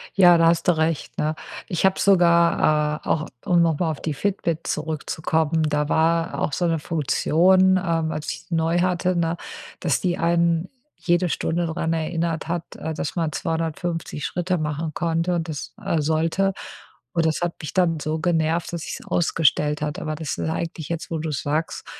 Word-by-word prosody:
Ja, 175 -3 +7
da 165 0 +5
hast 165 0 +2
du 175 -3 +4
recht, 160 -1 -1
ne? 155 +1 0 0.3
Ich 175 +1 0
habe 190 - +3
sogar 170 -5 +3
äh, - - -8
auch, 155 -1 0 0.2
um 175 -3 +4
noch 165 -3 +2
mal 170 - +1
auf 155 - -7
die 155 - -2
Fitbit 170 -1 -2
zurückzukommen, 160 +1 -1
da 150 -1 0
war 165 +1 +1
auch - - 0
so 175 - 0
'ne 165 -1 +1
Funktion, 180 +5 +3
ähm, 165 -3 0
als 150 - -4
ich - - -6
die 170 - -1
neu 165 +1 +1
hatte, 180 0 +1
ne, 170 0 0 0.4
dass 160 -5 0
die 175 -2 0
einen 170 0 +2 0.3
jede 175 0 +1
Stunde 170 +2 -1
dran 165 0 -1
erinnert 165 0 -2
hat, 170 0 -4
äh, 160 +1 -4
dass 150 - -4
man 165 -3 0
250 165 0 -3
Schritte 180 +1 -1
machen 155 0 -3
konnte 170 +1 0
und 165 -1 -2
das 150 -3 -6
äh, 175 -6 0
sollte. 160 +5 +1 0.6
Und 165 -1 +1
das 160 +1 0
hat 175 -1 -1
mich 155 - -6
dann 170 -4 +2
so 155 +2 -2
genervt, 165 0 0
dass 170 -2 -4
ich - - -5
es - - -15
ausgestellt 150 -2 +1
hatte. 150 -1 -3
Aber 155 0 -3
das 155 -2 -4
ist 160 - -2
eigentlich 165 -1 -4
jetzt, 170 0 -4
wo 165 - -1
du 160 +1 -3
es 145 - -2
sagst 155 +3 -2
165 Hz, 195 wpm, -23 LUFS, 155-175 Hz, 0.6 s, Ja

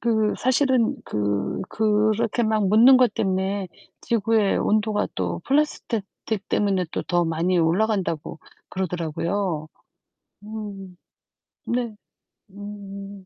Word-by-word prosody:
그 220 -2 +1
사실은 260 -2 +2
그 105 -1 -1
그렇게 215 +2 +1
막 215 -3 +1
묻는 235 +6 +7
것 245 -5 +3
때문에 190 0 -1 0.3
지구의 225 -2 +2
온도가 215 0 +1
또 - - -2
플라스택 270 -6 0 0.2
틱 210 -3 -2
때문에 195 -3 +1
또 - - -3
더 175 -1 +1
많이 170 +3 +1
올라간다고 175 -2 0 0.3
그러더라고요. 170 -1 -2 0.8
음. 205 -4 -8 0.7
네. 235 -3 -2 0.6
음. 200 -1 -9
205 Hz, 215 characters per minute, -24 LUFS, 185-220 Hz, 0.8 s, 묻는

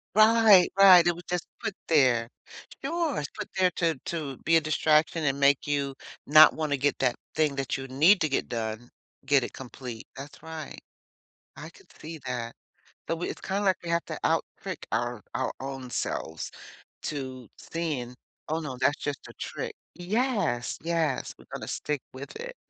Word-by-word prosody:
Right, 215 -4 +7
right, 185 -3 +9
it 175 - +3
was 175 0 -11
just 180 -2 -2
put 200 - -3
there. 125 -7 +4 0.6
Sure, 330 - 0
it's 145 - -4
put - - -7
there 185 -1 +4
to 165 -3 +2
to 150 -6 -4
be 165 +1 +3
a - - +6
distraction 155 +1 +2
and 135 0 +1
make 140 +1 +3
you 140 -2 0 0.3
not 155 +2 +9
wanna 150 -3 -1
get 140 +1 0
that 125 -2 +2 0.2
thing 155 -3 +2
that 135 0 -2
you 135 0 -6
need 160 +9 +5
to 155 - +2
get 135 - -1
done, 115 0 -4 0.3
get 135 -2 +3
it - - -6
complete. 125 -3 -8
That's 140 +4 -10
right. 160 -2 -8 0.8
I - - -9
could - - -20
see 160 0 -7
that. 120 -2 -4 0.5
But 165 - -2
we 175 - -3
it's - - -7
kinda 200 +2 -2
like 190 -2 +4
we 170 - -5
have 170 0 +1
to - - -5
out - - +2 0.2
trick - - -6
our 120 -2 -1
our - - 0
own 135 -1 -6
selves 80 -8 -3 0.5
to 130 -5 -5
sayin', 145 -7 -4 0.3
"Oh, 160 +1 0
no, 145 -5 -5
that's 145 +3 +2
just 145 -2 -3
a - - -11
trick." - - -5 0.2
Yes, 200 - -1
yes. 165 -5 -1
We're - - -17
gonna - - -6
stick 150 -3 -3
with 135 +2 -9
it. - - -7
150 Hz, 180 wpm, -27 LUFS, 130-170 Hz, 0.8 s, right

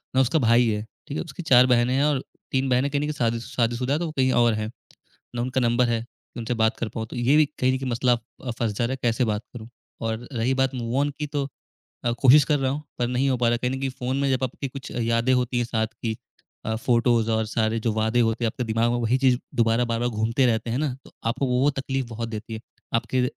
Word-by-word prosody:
ना 130 - +5
उसका 135 +5 +2
भाई 120 -1 +4
है, 105 -1 0 0.3
ठीक 145 - -4
है? - - -2
उसकी 165 +1 -8
4 125 -4 +6
बहनें 125 0 +3
हैं 135 - +2
और 145 -3 +1 0.3
3 135 0 +1
बहनें 130 +3 +2
कहीं 140 - +1
न - - -1
कहीं 150 - -1
शादी 115 -5 0
शादीशुदा 120 +3 -1
हैं, 150 - +1
तो 175 - -1
वो 155 - -4
कहीं 130 -1 +3
और 120 -1 +4
हैं, 110 0 -2 0.7
ना 120 - 0
उनका 130 +1 -1
नंबर 120 0 +2
है 115 -1 +1
कि 120 0 -13
उनसे 115 +1 -2
बात 110 0 +2
कर 115 - -2
पाऊँ। 110 0 -5
तो - - -7
ये 125 +5 +3
भी 155 - +5
कहीं 130 0 +2
न - - -1
कहीं 130 -1 -3
मसला 120 +1 +2 0.4
फँस 115 -3 0
जा 105 - -1
रहा 120 - -1
है, 135 - -3
कैसे 120 +1 +2
बात 105 -1 -1
करूँ? 115 -1 -8 0.3
और 115 +1 -3
रही 120 +2 0
बात 130 0 +1
मूव 120 0 -3
ऑन 145 +1 +1
की, 150 - -2
तो 145 -2 -2 0.6
अ, 120 - +2
कोशिश 140 +2 +8
कर 150 -2 +1
रहा 135 -1 0
हूँ 145 +2 -4 0.2
पर 120 - +1
नहीं 125 +2 +1
हो 130 - +2
पा 120 -1 +2
रहा, 120 - +2
कहीं 125 +1 -1
न 130 - -2
कहीं 135 - -1
फ़ोन 130 0 -3
में 140 -1 +1
जब 130 0 +1
आपकी 130 +2 -4
कुछ 135 0 -8
यादें 115 +1 +1
होती 125 0 0
हैं 120 - +1
साथ 110 -1 0 0.2
की 110 -2 -1 0.5
अ, 110 - 0
फ़ोटोज़ 115 -1 +2
और 110 0 +1
सारे 110 0 0
जो 115 0 0
वादे 110 +2 +1
होते 115 +1 +1
हैं, - - +3
आपके 125 +3 -3
दिमाग 115 +1 +1
में 120 - 0
वही 120 +3 +2
चीज़ 130 -2 +3 0.2
दोबारा 115 +1 +3
बार-बार 115 +1 -1
घूमते 115 +3 +1
रहते 115 -1 0
हैं 120 - 0
ना? 145 -3 -1
तो - - -16
आपको 115 +4 0
वो 130 +3 +3
तकलीफ़ 135 -1 -2
बहुत 115 0 -5
देती 110 0 -6
है, 110 - -6 0.3
आपके 125 +2 +1
120 Hz, 265 wpm, -24 LUFS, 115-130 Hz, 0.7 s, कोशिश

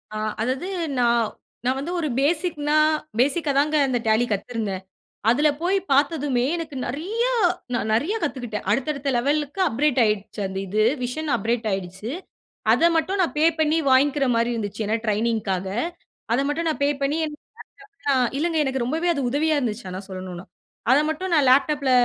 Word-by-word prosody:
ஆ - - -2 0.2
அதாவது 260 +10 -1 0.3
நா 240 - +4 0.6
நான் 260 +1 +1
வந்து 325 +6 -4
ஒரு 315 - -1
பேசிக்னா 300 0 +1 0.4
பேஸிக்காதாங்க 290 +1 +2
அந்த 250 -2 +1
Tally 220 +2 +3
கத்துருந்தேன். 205 -2 -3 0.5
அதுல 295 +5 +4
போய் 375 +3 +2
பார்த்ததுமே, 280 -3 +2
எனக்கு 325 -4 -5
நெறையா 415 - -1 0.4
நான் 220 -3 -1
நெறையா 330 - +1
கத்துக்கிட்டேன். 245 -8 -3
அடுத்த 270 +7 +1
அடுத்த 280 0 -3
லெவலுக்கு 290 +6 -1
அப்கிரேட் 265 +2 +1
ஆயிடுச்சு 210 -1 -1
அந்த 190 - -6
இது. 215 +3 +1 0.2
விஷன் 300 +5 -3
அப்கிரேட் 225 +2 -1
ஆயிடுச்சு. 190 +4 -4 0.6
அத 335 - +5
மட்டும் 380 +5 0
நான் 340 - -1
பே 310 - +3 0.2
பண்ணி 310 +1 +3
வாங்கிக்கிற 275 +2 +4
மாரி 230 +1 +1
இருந்துச்சு. 215 -1 -3
ஏன்னா 220 - +1
ட்ரெய்னிங்க்காக. 210 -3 0 0.7
அத 240 - +3
மட்டும் 330 +3 -1
நான் 305 - -2
பே - - +3
பண்ணி, 280 +3 +1
எனக்கு 300 0 -8 0.5
லேப்டாப்லாம் 275 - 0
இல்லங்க, 325 +1 0
எனக்கு 265 -2 -1
ரொம்பவே 320 +8 -1
அது 280 - -2
உதவியா 305 +2 +1
இருந்துச்சு, 225 -4 -3
ஆனா 185 +1 -5
சொல்லணும்னா. 185 -1 -7 0.5
அத 275 - +6
மட்டும் 370 +3 -3
நான் 295 -4 +4
லேப்டாப்ல 280 +1 +3
270 Hz, 160 wpm, -23 LUFS, 225-305 Hz, 0.7 s, அத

